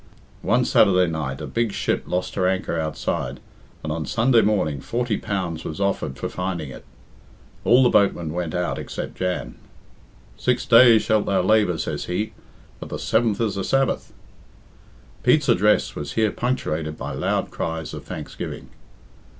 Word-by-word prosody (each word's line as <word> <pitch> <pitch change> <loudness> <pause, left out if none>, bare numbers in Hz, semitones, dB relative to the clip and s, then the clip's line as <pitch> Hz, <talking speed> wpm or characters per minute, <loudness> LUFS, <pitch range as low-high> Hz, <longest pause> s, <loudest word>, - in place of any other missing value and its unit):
One - - +2
Saturday 90 -1 +4
night 80 -5 -3
a - - -4
big 115 -2 -1
ship - - -1
lost 90 +1 -2
her 90 - +1
anchor 95 -3 -1
outside, 80 -1 -3 0.4
and 80 - -3
on 80 0 -3
Sunday 115 0 +4
morning 80 -10 0
forty 120 - -1
pounds 90 -6 -3
was 80 - -6
offered 100 -9 -1
for - - -3
finding 90 -6 -4
it. - - -11 0.8
All 125 +2 +5
the 125 - +5
boatmen 85 -6 +2
went 85 -2 -3
out 85 -7 -1
except - - -5
Jan. 90 -1 -3 0.8
'Six 125 -1 0
days 115 -2 +7
shalt 110 -1 +1
thou 95 -2 +2
labour,' 105 -4 +3
says - - -3
he, 95 +5 -2 0.5
'but - - -8
the - - -4
seventh 110 -3 +1
is 110 -4 +1
the 100 0 -3
Sabbath.'" 135 +4 0 1.1
Pete's - - +3
address 105 +3 +3
was 75 -1 -5
here 110 -2 +2
punctuated 80 -11 -2
by 70 - -5
loud 65 - -1
cries 80 -1 -4
of - - -7
thanksgiving. - - -7
95 Hz, 160 wpm, -23 LUFS, 80-110 Hz, 1.1 s, days